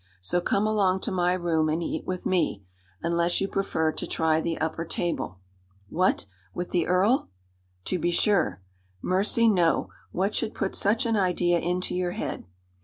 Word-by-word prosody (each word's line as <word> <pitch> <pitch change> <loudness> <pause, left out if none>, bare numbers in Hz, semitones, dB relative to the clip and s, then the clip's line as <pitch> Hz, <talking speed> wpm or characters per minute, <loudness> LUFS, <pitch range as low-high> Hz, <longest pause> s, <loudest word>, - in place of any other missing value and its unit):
So 95 - 0
come 200 +4 +1
along 195 -3 +2
to 225 - -2
my 180 -1 +2
room 165 -3 +1
and 160 +2 0
eat - - -4
with 185 -1 -4
me 170 - 0 0.4
unless 170 +1 +1
you 195 - 0
prefer 160 -5 0
to - - -5
try 160 -1 +2
the 165 0 -2
upper 160 +1 -2
table." 170 - -2 0.5
"What! 185 - +1 0.3
with 175 0 -4
the 175 -2 +1
earl?" 195 +8 +2 0.6
"To 185 - -1
be 175 - +1
sure." 170 - +1 0.4
"Mercy, 205 +5 +2
no! 175 -6 +3 0.2
What 195 +3 0
should 220 - -1
put 195 - -2
such 220 +5 +2
an 230 -1 +1
idea 175 -2 +2
into 180 +2 -1
your 180 -1 -1
head?" - - -4
180 Hz, 170 wpm, -26 LUFS, 165-195 Hz, 0.6 s, no